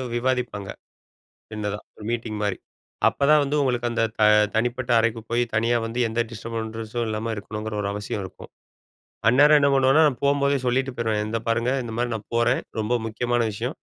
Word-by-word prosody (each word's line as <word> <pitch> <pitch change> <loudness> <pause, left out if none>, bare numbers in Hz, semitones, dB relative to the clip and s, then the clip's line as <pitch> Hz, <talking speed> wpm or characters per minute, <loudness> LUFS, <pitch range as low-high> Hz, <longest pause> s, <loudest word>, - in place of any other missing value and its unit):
விவாதிப்பாங்க. 120 -5 -1 0.8
சின்னதா 105 -1 -3 0.2
ஒரு 105 - -11
மீட்டிங் 115 -3 -3
மாரி. 100 -3 -1 0.5
அப்பதான் 150 +2 +3
வந்து 145 +1 -1
உங்களுக்கு 120 -3 0
அந்த 115 -1 0 0.2
த - - +1 0.3
தனிப்பட்ட 120 +2 -1
அறைக்கு 115 0 +1
போய், 120 +1 +2
தனியா 115 +2 +2
வந்து 115 +2 -5
எந்த 115 +1 -1
டிஸ்டர்பன்ஸ்ஸும் 115 +1 -4
இல்லாம 110 +1 -2
இருக்கணுங்கிற 105 +1 -6
ஒரு 100 - -2
அவசியம் 105 0 -4
இருக்கும். 95 - -11 0.8
அந்நேரம் 145 +5 +6
என்ன 140 0 +3
பண்ணுவேனா, 135 +3 +5
நான் 135 -4 -3
போம்போதே 140 0 +2
சொல்லிட்டு 130 +1 0
போயிருவேன். 110 -2 0
"இந்த 115 +1 -2
பாருங்க. 120 +2 +1
இந்த 115 -2 -6
மாரி 120 0 -1
நான் 110 - -8
போறேன். 120 +2 +2 0.2
ரொம்ப 110 +3 0
முக்கியமான 120 +2 -1
விஷயம். 100 - -4
115 Hz, 165 wpm, -24 LUFS, 110-125 Hz, 0.8 s, அந்நேரம்